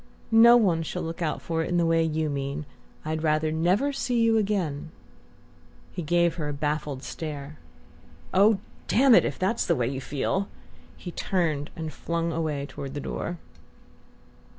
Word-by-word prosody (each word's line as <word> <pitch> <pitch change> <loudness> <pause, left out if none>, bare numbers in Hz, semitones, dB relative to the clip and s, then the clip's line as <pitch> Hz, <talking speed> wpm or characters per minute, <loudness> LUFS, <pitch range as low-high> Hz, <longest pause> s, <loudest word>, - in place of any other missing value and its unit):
"No 235 +2 +8
one 180 -8 +2
shall 160 - -4
look 165 +1 -5
out 160 -2 -2
for 165 -1 -1
it - - -4
in 175 - +1
the 170 - +3
way 165 0 +3
you 160 -1 0
mean. 140 +1 -3 0.4
I'd 155 0 -2
rather 155 0 +1
never 185 - +1
see 250 -3 0
you 230 -1 +4
again 190 -9 -1 0.5
" 80 -1 -28
He 180 - -3
gave 170 +2 +2
her 150 -3 -2
a - - -3
baffled 145 -1 -2
stare. 150 -2 -6 0.7
"Oh, 205 +2 +5 0.3
damn 260 +1 +5
it - - +6
if - - -3
that's 195 +5 0
the - - +3
way 120 -2 0
you 130 +1 -3
feel!" 165 +9 -1 0.5
He 175 - -7
turned 160 -6 -1
and 160 -2 -5
flung 170 +2 -2
away 155 -3 -2
toward 140 0 -7
the - - -2
door. 175 +4 -4
160 Hz, 175 wpm, -26 LUFS, 150-185 Hz, 0.7 s, No